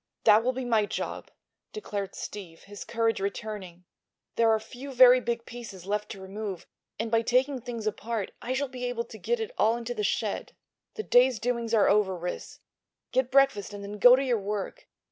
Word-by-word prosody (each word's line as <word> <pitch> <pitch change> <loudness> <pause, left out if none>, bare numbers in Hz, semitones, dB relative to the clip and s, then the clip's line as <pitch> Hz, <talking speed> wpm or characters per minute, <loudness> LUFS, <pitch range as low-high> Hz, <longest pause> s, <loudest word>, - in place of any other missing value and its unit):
"That 215 +2 +6
will 255 - +2
be 260 0 -4
my 220 -4 +2
job," - - -5 0.4
declared 205 - -5
Steve, 180 -6 -8
his 205 0 -9
courage 225 -2 0
returning. 195 -3 -5 0.5
"There 230 -1 +4
are 220 0 +3
few 260 +5 -9
very 255 0 +8
big 235 -1 -3
pieces 220 -7 -9
left 210 +1 -2
to 195 - -8
remove, 195 -1 -6 0.3
and 225 +1 -3
by 225 0 +4
taking 255 +3 +1
things 230 -2 -6
apart 215 0 -3
I 250 - -2
shall 280 +2 -1
be 250 -1 -6
able 245 -1 -2
to 220 - -12
get 475 0 -1
it 445 +1 -4
all 225 +2 +3
into 240 0 -4
the 215 -3 -3
shed. 205 +1 -2 0.4
The 435 - -4
day's 250 - +4
doings 235 -1 -1
are 210 - +4
over, 200 -3 +3
Ris. 180 +1 -6 0.5
Get 255 0 +1
breakfast 270 -7 +3
and 200 - -8
then 205 +1 -7
go 245 +4 +9
to 270 - 0
your 245 -4 +1
work. 205 - -5
225 Hz, 195 wpm, -28 LUFS, 205-250 Hz, 0.5 s, go